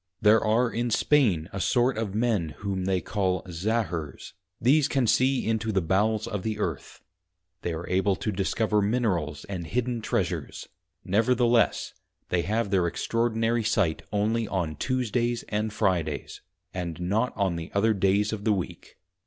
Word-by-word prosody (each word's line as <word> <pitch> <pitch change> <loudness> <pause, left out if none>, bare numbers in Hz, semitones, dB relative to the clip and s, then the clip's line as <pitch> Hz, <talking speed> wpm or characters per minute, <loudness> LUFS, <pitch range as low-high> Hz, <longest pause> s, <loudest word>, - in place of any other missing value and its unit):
There 105 +1 +5
are 115 +3 +2
in 120 +1 -1
Spain 110 - +2
a 100 - -3
sort 125 +5 +2
of 110 -3 -3
men 105 -10 0
whom 95 -2 -2
they 95 -1 +1
call 95 -3 -1
Zahurs, 85 - -3 0.3
these 140 +4 +4
can 135 -4 +1
see 130 +4 +2
into 110 0 0
the 100 - +2
Bowels 105 +5 +1
of 105 -3 -3
the 110 +2 -3
Earth; 85 -9 -4 0.6
they 85 - -2
are 80 +1 -5
able 95 +1 +2
to 105 +6 -3
discover 105 +2 +1
Minerals 100 - -1
and 90 -4 -5
hidden 120 +1 -1
Treasures; 90 - -2 0.4
nevertheless, 120 +3 +2 0.4
they 90 - +1
have 105 +3 -1
their 90 -3 +3
extraordinary 115 +4 0
sight 105 -7 +1
only 110 +2 0
on 85 -6 -2
Tuesdays 120 - -1
and 105 +1 -1
Fridays, 85 - -1 0.3
and 85 -2 -4
not 105 +8 0
on 95 -4 +1
the 85 +1 -6
other 110 +2 +3
days 100 +2 +2
of 105 -2 -5
the 110 - +3
Week. 95 -3 -6
105 Hz, 155 wpm, -26 LUFS, 90-115 Hz, 0.6 s, There